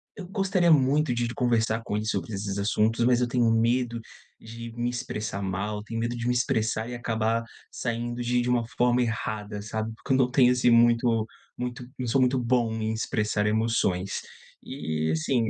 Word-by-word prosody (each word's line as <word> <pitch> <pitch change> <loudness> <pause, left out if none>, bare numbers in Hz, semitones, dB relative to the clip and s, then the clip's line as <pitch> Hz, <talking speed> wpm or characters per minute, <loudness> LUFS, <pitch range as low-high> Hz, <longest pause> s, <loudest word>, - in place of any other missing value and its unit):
eu 195 -4 -8
gostaria 190 -2 +1
muito 145 -1 +4
de 120 0 0
de 120 - -4
conversar 115 -2 +1
com 105 - -3
ele 105 +1 -2
sobre 110 0 -2
esses 100 0 -3
assuntos, 110 +3 +1
mas 125 0 +3
eu 125 - +2
tenho 120 -1 +2
medo 115 +1 +1 0.4
de 115 +1 -9
me 120 0 -1
expressar 110 -4 -4
mal. 100 +2 -3
Tenho 115 +1 -4
medo 120 +1 -2
de 120 0 -3
me 125 - +2
expressar 115 -3 0
e - - -5
acabar 115 -1 0 0.3
saindo 120 0 -3
de 120 0 +1
de 120 - -1
uma 120 -2 +1
forma 125 0 +3
errada, 105 -3 -3
sabe, 110 +1 -4
porque 115 - -7
eu - - +4
não 130 -2 +3
tenho, 125 -1 +5
assim, 125 -1 +3
muito 115 -1 +4 0.3
muito 125 0 -4
não 125 - -3
sou 125 +4 +2
muito 130 +1 +3
bom 120 -2 +1
em 110 0 -2
expressar 105 -2 -1
emoções. 105 -4 0 0.4
E, 80 - -3
assim, 110 +9 +1
115 Hz, 190 wpm, -26 LUFS, 110-125 Hz, 0.4 s, tenho